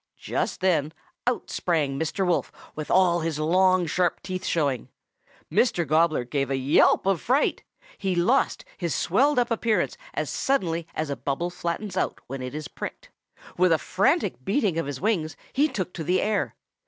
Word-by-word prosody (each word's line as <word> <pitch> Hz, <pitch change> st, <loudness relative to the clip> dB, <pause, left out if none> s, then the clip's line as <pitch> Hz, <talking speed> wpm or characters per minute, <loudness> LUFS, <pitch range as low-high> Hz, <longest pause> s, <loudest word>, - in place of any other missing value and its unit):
"Just -, -, -2 dB
then 160 Hz, -5 st, +2 dB, 0.3 s
out 245 Hz, -, -1 dB
sprang 150 Hz, -6 st, 0 dB
Mr. 160 Hz, +4 st, -1 dB
Wolf 175 Hz, -1 st, 0 dB, 0.2 s
with 155 Hz, -1 st, -6 dB
all 180 Hz, -2 st, +4 dB
his 160 Hz, -2 st, -2 dB
long, 185 Hz, +3 st, +3 dB
sharp 175 Hz, +2 st, 0 dB
teeth 185 Hz, -1 st, -4 dB
showing. 140 Hz, -7 st, 0 dB, 0.6 s
Mr. 180 Hz, -9 st, +2 dB
Gobbler 155 Hz, -2 st, +3 dB
gave 135 Hz, +2 st, -2 dB
a 135 Hz, -, +1 dB
yelp 135 Hz, +7 st, +4 dB
of 195 Hz, -4 st, +1 dB
fright. 265 Hz, +5 st, +1 dB, 0.4 s
He 190 Hz, -2 st, 0 dB
lost 230 Hz, +11 st, +2 dB
his 170 Hz, -4 st, -1 dB
swelled 270 Hz, -, +2 dB
up 245 Hz, -1 st, +2 dB
appearance 225 Hz, -1 st, +1 dB, 0.2 s
as -, -, -1 dB
suddenly 170 Hz, -11 st, 0 dB
as 155 Hz, -2 st, -2 dB
a -, -, -1 dB
bubble 155 Hz, +7 st, -2 dB
flattens 180 Hz, +3 st, -4 dB
out -, -, -1 dB
when 135 Hz, +1 st, -6 dB
it 125 Hz, +2 st, -5 dB
is 155 Hz, -1 st, -5 dB
pricked. -, -, -8 dB, 0.5 s
With 180 Hz, 0 st, +4 dB
a 165 Hz, -, +5 dB
frantic 200 Hz, -, +1 dB
beating 195 Hz, -, +1 dB
of 165 Hz, -, -2 dB
his 140 Hz, -3 st, -4 dB
wings 170 Hz, -8 st, 0 dB, 0.2 s
he 290 Hz, +3 st, +3 dB
took 185 Hz, -, -4 dB
to 165 Hz, -, -5 dB
the 180 Hz, +4 st, +2 dB
air. 210 Hz, 0 st, 0 dB
175 Hz, 175 wpm, -25 LUFS, 155-195 Hz, 0.6 s, a